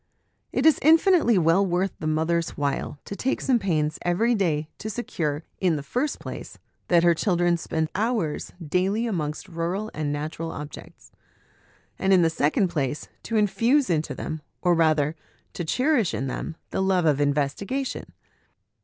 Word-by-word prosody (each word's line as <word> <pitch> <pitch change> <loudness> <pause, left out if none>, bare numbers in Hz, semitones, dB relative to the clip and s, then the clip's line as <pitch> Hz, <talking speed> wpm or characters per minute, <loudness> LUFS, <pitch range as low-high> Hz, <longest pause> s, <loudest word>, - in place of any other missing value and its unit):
It 260 - 0
is 315 - +6
infinitely 325 - +5
well 165 +3 +4
worth 185 0 0
the 155 - -3
mother's 160 +2 0
while 145 0 -2
to 200 - -6
take 265 +6 -1
some 255 -3 +2
pains 155 -6 0
every 210 +8 +2
day 160 -8 0
to 215 - -5
secure, 160 -9 -3 0.2
in 180 -4 +2
the 145 - -4
first 255 - -1
place, - - -8 0.3
that 170 -1 +4
her 170 0 +6
children 175 -1 +2
spend 160 -1 -2
hours 210 -7 -1 0.2
daily 190 +8 +1
amongst 155 -7 -3
rural 180 +5 -3
and 150 -1 -2
natural 155 +3 -4
objects; 150 0 -10 0.9
and, 195 0 +3
in 180 -2 +6
the 165 - +3
second 160 +6 +1
place, 145 -3 -2
to 225 - -2
infuse 230 +4 +2
into 155 -2 -1
them, 155 -1 -5 0.2
or 175 -1 +4
rather, 155 -2 +2 0.4
to 175 - -4
cherish 250 - +1
in 135 - -2
them, 135 +5 -4 0.2
the - - -1
love 190 -2 +2
of 145 -2 +3
investigation. 150 - -1
175 Hz, 160 wpm, -25 LUFS, 155-215 Hz, 0.9 s, is